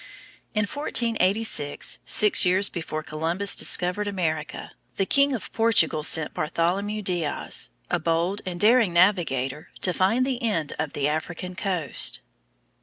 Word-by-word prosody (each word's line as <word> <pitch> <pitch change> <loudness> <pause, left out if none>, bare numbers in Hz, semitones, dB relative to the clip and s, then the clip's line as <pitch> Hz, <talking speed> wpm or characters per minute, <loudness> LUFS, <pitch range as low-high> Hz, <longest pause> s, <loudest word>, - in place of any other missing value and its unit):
In 215 - +2
1486, 220 - -1
six 200 +11 +4
years 185 +2 +3
before 160 -3 -5
Columbus 165 +6 -1
discovered 180 +4 +1
America, 160 -6 -3 0.2
the 195 - 0
King 280 +6 +3
of 230 - -5
Portugal 225 -9 +3
sent 155 0 -1
Bartholomew 195 +7 -1
Diaz, 170 - -1 0.2
a 175 - 0
bold 170 +4 -1
and 180 -2 -5
daring 220 -2 +4
navigator, 160 -7 +1
to 180 - +1
find 215 +9 +2
the 260 -1 -2
end 185 -11 -1
of 155 -2 -3
the 140 0 0
African 175 +4 -4
coast. 180 -7 0
180 Hz, 130 wpm, -24 LUFS, 160-210 Hz, 0.2 s, six